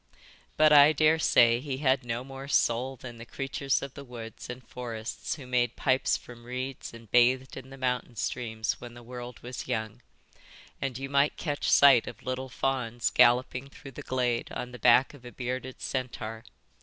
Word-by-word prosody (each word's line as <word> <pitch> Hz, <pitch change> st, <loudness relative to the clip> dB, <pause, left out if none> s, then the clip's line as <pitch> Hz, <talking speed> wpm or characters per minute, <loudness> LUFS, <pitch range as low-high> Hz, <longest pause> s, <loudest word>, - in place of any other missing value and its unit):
But 155 Hz, 0 st, +6 dB
I 145 Hz, +1 st, +8 dB
daresay 155 Hz, -6 st, +4 dB
he 135 Hz, 0 st, -4 dB
had 130 Hz, -2 st, +2 dB
no 120 Hz, 0 st, -3 dB
more 135 Hz, +1 st, -9 dB
soul 130 Hz, 0 st, +1 dB
than 120 Hz, -2 st, -10 dB
the -, -, -7 dB
creatures 135 Hz, +1 st, -1 dB
of 140 Hz, -1 st, -7 dB
the 140 Hz, -, -9 dB
woods 120 Hz, -4 st, -9 dB
and 125 Hz, +1 st, -8 dB
forests 115 Hz, 0 st, -5 dB
who 140 Hz, -4 st, -10 dB
made 125 Hz, -1 st, 0 dB
pipes 130 Hz, -1 st, +2 dB
from 120 Hz, -1 st, -13 dB
reeds 130 Hz, +2 st, -5 dB
and 115 Hz, -2 st, -14 dB
bathed 125 Hz, +2 st, +3 dB
in 130 Hz, -, -9 dB
the 135 Hz, -, -11 dB
mountain 125 Hz, -2 st, -2 dB
streams 110 Hz, -1 st, -3 dB
when 120 Hz, -1 st, -9 dB
the 120 Hz, -, -12 dB
world 120 Hz, 0 st, -8 dB
was 125 Hz, +1 st, -6 dB
young, 110 Hz, -4 st, -3 dB, 0.8 s
and 135 Hz, -3 st, -2 dB
you 135 Hz, +1 st, -5 dB
might 140 Hz, +1 st, +2 dB
catch 145 Hz, -3 st, -2 dB
sight 135 Hz, -4 st, +6 dB
of -, -, -9 dB
little 130 Hz, +1 st, -4 dB
fawns 125 Hz, -3 st, -1 dB
galloping 125 Hz, +2 st, +3 dB
through 135 Hz, 0 st, -12 dB
the -, -, -9 dB
glade 125 Hz, -2 st, -1 dB
on 125 Hz, -, -5 dB
the 125 Hz, -, -10 dB
back 125 Hz, +3 st, +5 dB
of 140 Hz, -4 st, -15 dB
a 125 Hz, -, -9 dB
bearded 130 Hz, +1 st, -5 dB
centaur. 120 Hz, -3 st, -4 dB
125 Hz, 180 wpm, -28 LUFS, 120-135 Hz, 0.8 s, I